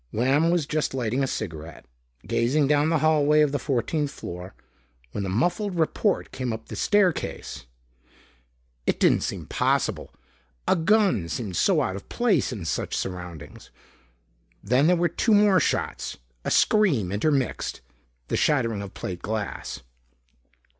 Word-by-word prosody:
Lamb 135 +8 +2
was 170 -3 +1
just 150 -2 -1
lighting 125 +1 -1
a 135 - +1
cigaret, 85 -9 -6 0.4
gazing 120 +7 +2
down 150 +1 +3
the 165 - +3
hallway 150 -1 +4
of 150 -2 +3
the 145 - -1
fourteenth 140 +3 -1
floor, 90 -7 -8 0.6
when 100 - -3
the 95 - -3
muffled 175 - 0
report 170 +5 0
came 130 -2 -3
up 110 0 -7
the - - -6
staircase. 200 - 0 1.2
It - - +1
didn't - - +4
seem - - -4
possible, - - 0 0.6
a - - +4
gun 185 - +2
seemed 100 -4 -4
so - - +3
out 95 - -2
of 100 - -9
place 240 - +1
in 105 -9 -6
such - - -2
surroundings.... 90 -5 -7 0.9
Then 125 +8 +3
there 180 - +5
were 175 0 +2
two 215 +6 +2
more 205 -2 +5
shots, - - -2 0.3
a - - -2
scream 150 - +3
intermixed. 135 +5 -1 0.5
The - - -1
shattering 115 -8 +1
of 100 -1 -8
plate 90 -2 -5
glass. 105 0 -4
135 Hz, 145 wpm, -25 LUFS, 100-160 Hz, 1.2 s, there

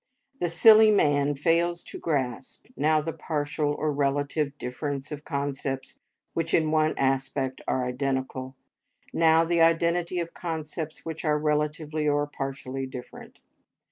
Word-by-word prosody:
The 175 - 0
silly 215 +5 +8
man 145 -7 +3
fails 170 +3 +1
to - - -9
grasp, 130 -5 -3
now 155 +1 +2
the 165 +1 -4
partial 150 -1 -2
or 155 +1 -1
relative 145 +1 -1
difference 140 +3 -4
of 150 0 -6
concepts 140 -2 -3 0.3
which 165 0 0
in 155 -2 +2
one 155 0 +2
aspect 135 0 -1
are 130 -1 0
identical, 130 0 -3 0.6
now 165 0 +4
the 170 0 +1
identity 170 +2 +2
of 170 -1 -3
concepts 160 -1 -5
which 160 -1 -5
are 150 -2 +2
relatively 150 0 -1
or 145 0 +2
partially 135 -2 -5
different. 125 -1 -10
150 Hz, 135 wpm, -26 LUFS, 135-165 Hz, 0.6 s, silly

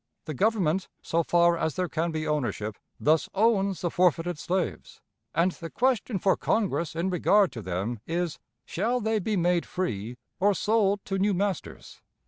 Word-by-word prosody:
The 155 - -4
Government, 190 - +1 0.2
so 170 - +1
far 170 +1 +3
as 160 -1 -1
there 185 -1 0
can 165 +1 -1
be 155 -1 -3
ownership, 120 -8 -2 0.2
thus 155 +1 +2
owns 200 -3 +2
the 175 - -1
forfeited 175 -2 +1
slaves, 185 +1 -3 0.4
and 170 +3 +3
the 165 -2 -8
question 245 -2 0
for 190 +1 +2
Congress 175 -7 -1
in 175 +3 -1
regard 195 +2 +3
to 115 - -7
them 95 +5 -3
is, 170 -2 -2 0.3
'Shall 245 +3 -1
they 220 -1 0
be 210 +1 -1
made 175 0 +2
free 120 - -3 0.2
or 200 +2 +3
sold 205 -2 +1
to 195 0 -2
new 200 0 +2
masters?'" 195 -1 -4
180 Hz, 165 wpm, -27 LUFS, 160-200 Hz, 0.4 s, far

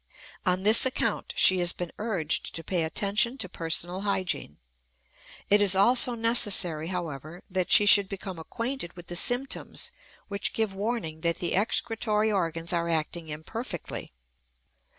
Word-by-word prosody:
On 180 +1 +1
this 215 +3 +7
account 260 -1 0
she 185 -1 +5
has 175 0 +2
been 175 -2 -6
urged 190 -8 -3
to 165 - -7
pay 175 -2 -1
attention 205 +9 0
to 220 - -2
personal 175 +2 -2
hygiene. 190 - -3 0.9
It 205 +1 +4
is 200 -2 +4
also 240 +4 +4
necessary, 205 -9 +4
however, 170 -2 -6
that 185 -1 -2
she 205 - +6
should 200 -1 +5
become 190 -3 -7
acquainted 230 +2 -5
with 175 -1 -12
the 175 - -5
symptoms 245 +8 0 0.4
which 200 -1 -2
give 220 -3 -2
warning 195 -6 -4
that 170 0 0
the 175 0 -3
excretory 215 +1 0
organs 165 -3 -1
are 170 0 -1
acting 160 0 -3
imperfectly. 175 - -7
190 Hz, 145 wpm, -26 LUFS, 170-215 Hz, 0.9 s, this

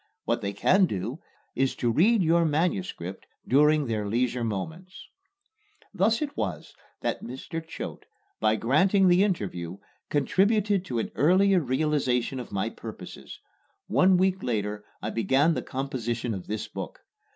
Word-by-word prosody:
What - - 0
they 100 - -2
can 185 - +3
do 110 - -4 0.3
is 135 0 0
to 120 - 0
read 200 - +4
your 170 +1 +4
manuscript 160 - -2 0.2
during 150 +2 +4
their 110 -4 -2
leisure 120 +2 0
moments." 160 - -5 0.9
Thus 215 - +2
it 285 - -5
was 90 -7 -4 0.3
that - - -2
Mr. 135 +6 -6
Choate, 165 - -8 0.3
by 110 0 +3
granting 185 - +3
the 180 +2 +5
interview, 95 - -2 0.3
contributed 200 +5 +2
to 125 -9 -3
an 115 - -2
earlier 185 - +4
realization 130 -3 0
of 125 - -8
my 100 -1 -1
purposes. - - -9 0.5
One 180 - +4
week 190 +1 +1
later 105 -3 -2 0.2
I 110 - -2
began 135 +9 +2
the - - -2
composition 125 -4 -3
of 95 -3 -7
this 110 0 -3
book. - - -7
135 Hz, 140 wpm, -27 LUFS, 110-180 Hz, 0.9 s, the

